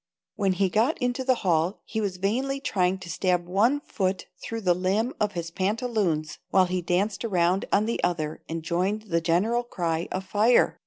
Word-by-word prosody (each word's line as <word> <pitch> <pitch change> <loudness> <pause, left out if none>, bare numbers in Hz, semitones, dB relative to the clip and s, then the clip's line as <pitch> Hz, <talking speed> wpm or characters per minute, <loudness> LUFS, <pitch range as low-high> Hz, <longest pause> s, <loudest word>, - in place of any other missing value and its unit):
When 195 -3 +1
he 195 +1 +2
got 225 - +2
into 250 +1 -1
the 255 0 +3
hall 170 +2 +2
he 220 - -3
was 195 -3 -2
vainly 255 +9 -1
trying 185 -7 +1
to 190 -2 -10
stab 180 0 +1
one 230 +10 +2
foot 190 -8 -2 0.2
through 225 0 -4
the 180 -3 +3
limb 195 +7 0
of 210 -1 0
his 170 -1 -4
pantaloons 190 - -1
while 190 -1 +4
he 180 0 -2
danced 190 +6 0
around 185 -3 +1
on 205 +2 +3
the 230 - -2
other 155 -3 -1
and 165 0 -4
joined 185 +6 -1
in 215 - -20
the 170 0 +1
general 190 +9 +2
cry 170 -8 -2
of 190 +1 -3
"Fire!" 220 +5 +3
190 Hz, 195 wpm, -26 LUFS, 175-220 Hz, 0.2 s, while